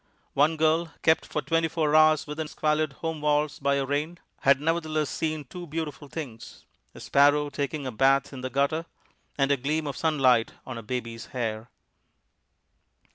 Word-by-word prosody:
One 155 +3 +3
girl, 160 +1 +2
kept 160 - +3
for - - -3
twenty 165 0 +1
four 155 -2 0
hours 155 -1 +5
within 150 +1 -4
squalid 155 0 0
home 160 -2 -2
walls 150 0 +1
by 140 0 +1
a 140 -1 0
rain, 150 +5 -2 0.2
had 140 0 +4
nevertheless 155 -1 -1
seen 155 -2 -2
two 175 +6 -9
beautiful 155 -1 -5
things 135 -7 -8 0.3
a - - -10
sparrow 145 +1 +3
taking 140 0 -3
a 130 - -3
bath 135 +4 +2
in 130 - -7
the 130 - -3
gutter, 140 +5 0 0.5
and 135 0 +2
a 140 - +3
gleam 150 +4 -1
of 140 - -4
sunlight 130 -7 +2
on 130 -3 -6
a - - -7
baby's 115 -1 -5
hair. 110 -1 -3
150 Hz, 170 wpm, -27 LUFS, 135-155 Hz, 0.5 s, hours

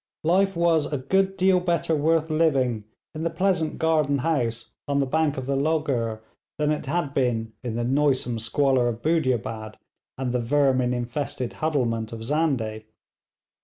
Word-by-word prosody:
Life 190 +4 +2
was 170 -3 +2
a 145 - 0
good 190 +8 +1
deal 185 -1 +4
better 170 -2 0
worth 160 +1 +1
living 135 -9 +1 0.3
in 155 - -6
the 165 - 0
pleasant 170 -1 0
garden 155 -3 +2
house 120 -6 -1 0.2
on 140 0 +1
the 140 - +2
bank 150 +1 0
of 130 - -4
the 140 +1 -1
Logur 135 -7 0 0.4
than 150 0 +1
it 150 -2 -3
had 145 -2 -1
been 115 -4 0
in 120 -3 -3
the 120 - -1
noisome 130 -2 +1
squalor 130 +2 +2
of 115 -1 -4
Budiabad 120 -9 -1 0.4
and 130 -1 -2
the 125 - +1
vermin 130 -1 +2
infested 120 0 -3
huddlement 120 -8 -1
of 115 -1 -7
Zandeh. 125 -6 -1
140 Hz, 160 wpm, -25 LUFS, 120-160 Hz, 0.4 s, deal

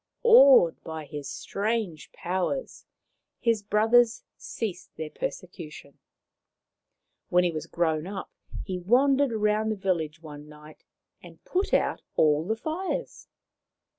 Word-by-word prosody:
Awed - - +7
by 160 -1 -6
his 145 0 -7
strange 205 -5 -3
powers, 185 +9 -3 0.5
his 230 -3 +1
brothers 225 +3 +3
ceased 200 -6 -6
their 155 -1 -5
persecution. 155 -5 -7 1.3
When 180 0 +4
he 175 - +1
was 155 -2 -6
grown 160 -1 -1
up 195 -1 -6 0.3
he 185 -2 -4
wandered 265 +7 +3
round 215 0 +1
the - - -1
village 170 -5 -2
one 150 -1 -10
night 150 0 -15 0.4
and - - -15
put 375 +2 -1
out - - +1
all 155 +2 +3
the 220 - 0
fires. 360 - -4
195 Hz, 120 wpm, -27 LUFS, 160-235 Hz, 1.3 s, Awed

